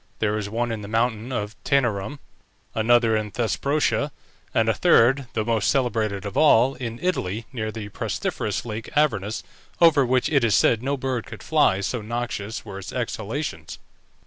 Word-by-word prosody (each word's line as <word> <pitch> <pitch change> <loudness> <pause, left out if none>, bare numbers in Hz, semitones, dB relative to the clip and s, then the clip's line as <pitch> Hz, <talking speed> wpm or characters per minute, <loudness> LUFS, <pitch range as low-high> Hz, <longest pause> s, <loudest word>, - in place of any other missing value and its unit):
There 110 -1 0
was 105 -1 -2
one 120 +2 -1
in 110 -2 -4
the 100 - -7
mountain 115 +2 0
of 105 -3 -3
Taenarum, 120 -1 0 0.6
another 115 0 +3
in 110 -1 -1
Thesprotia, 140 +8 0 0.4
and 115 - +2
a 110 - +4
third, 135 -4 +4
the 110 -1 -1
most 115 -2 +1
celebrated 110 -7 0
of 100 - -5
all, 135 -3 +5
in 120 -3 -5
Italy, 115 - -1
near 110 -3 -3
the 105 -2 -7
pestiferous - - -3
Lake 110 -1 -5
Avernus, 110 -9 +1 0.4
over 160 -5 +6
which 130 0 +2
it 140 -5 +2
is 110 -5 +3
said 110 +3 +3
no 140 +2 -1
bird 130 -3 -3
could - - -10
fly, 95 +1 +3
so 115 +4 -2
noxious 115 -1 -4
were 100 -2 -7
its 95 - -8
exhalations. 110 - -4
115 Hz, 170 wpm, -24 LUFS, 105-130 Hz, 0.6 s, over